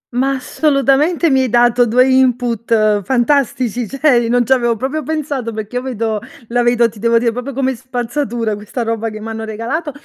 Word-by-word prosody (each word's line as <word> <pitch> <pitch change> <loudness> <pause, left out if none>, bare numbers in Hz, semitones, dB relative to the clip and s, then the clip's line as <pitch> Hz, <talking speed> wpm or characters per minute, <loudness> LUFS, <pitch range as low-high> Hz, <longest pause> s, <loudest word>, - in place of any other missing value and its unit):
Ma, 270 +2 +1
assolutamente, 285 +4 +1
mi 265 - +3
hai 260 - 0
dato 240 +1 +3
2 250 +3 +4
input 235 -5 +2
fantastici, 245 0 0
cioè, 265 -2 +2
non 245 0 +2
ci 265 - +4
avevo 240 -2 +1
proprio 270 +7 -3
pensato, 285 -5 -3
perché 220 +2 -5
io - - -1
vedo 225 -4 -2 0.3
la 245 +1 +1
vedo, 240 0 +3
ti 215 -1 -12
devo 230 +2 +2
dire, 230 0 +1
proprio 250 +4 -5
come 265 0 -1
spazzatura 240 -2 -3
questa 210 +4 -5
roba 225 0 -2
che 215 0 -8
m'hanno 225 +1 -6
regalato. 230 +9 -4
245 Hz, 180 wpm, -16 LUFS, 230-265 Hz, 0.3 s, 2